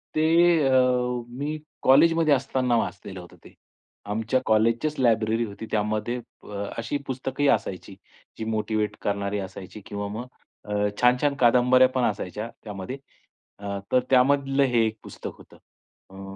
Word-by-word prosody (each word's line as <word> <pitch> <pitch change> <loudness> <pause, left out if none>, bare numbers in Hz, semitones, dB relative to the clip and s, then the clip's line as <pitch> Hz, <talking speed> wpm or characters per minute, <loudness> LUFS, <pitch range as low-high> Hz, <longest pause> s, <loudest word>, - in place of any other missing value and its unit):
ते 155 - +2 0.4
अ, - - +2 0.6
मी 145 +5 -4 0.2
कॉलेजमध्ये 155 +3 +5
असताना 130 -2 +1
वाचलेलं 95 -2 -4
होतं 90 - -13
ते. - - -15 0.5
आमच्या 115 +5 0
कॉलेजचीच 115 +7 +2
लायब्ररी 115 -1 +2
होती. 105 +2 -8
त्यामध्ये 110 +3 -1 0.3
अ, 100 -1 -5
अशी 115 +5 -2
पुस्तकंही 135 +2 -2
असायची 95 -5 -1 0.4
जी 110 - -4
मोटिव्हेट 110 -1 -1
करणारी 100 0 -2
असायची 95 +2 -8
किंवा 100 0 -5
मग 110 +4 -5 0.4
अ, 105 - -6 0.3
छान-छान 125 +4 +3
कादंबऱ्यापण 125 +1 +4
असायच्या 105 +2 -5
त्यामध्ये. 105 +4 -6 0.6
अ, 100 -1 -4
तर 130 - +5
त्यामधलं 135 +1 +3
हे 120 -4 +3
एक 110 0 -3
पुस्तक - - -8
होतं. - - -17 0.5
अ 95 0 -9
115 Hz, 130 wpm, -25 LUFS, 105-130 Hz, 0.6 s, कॉलेजमध्ये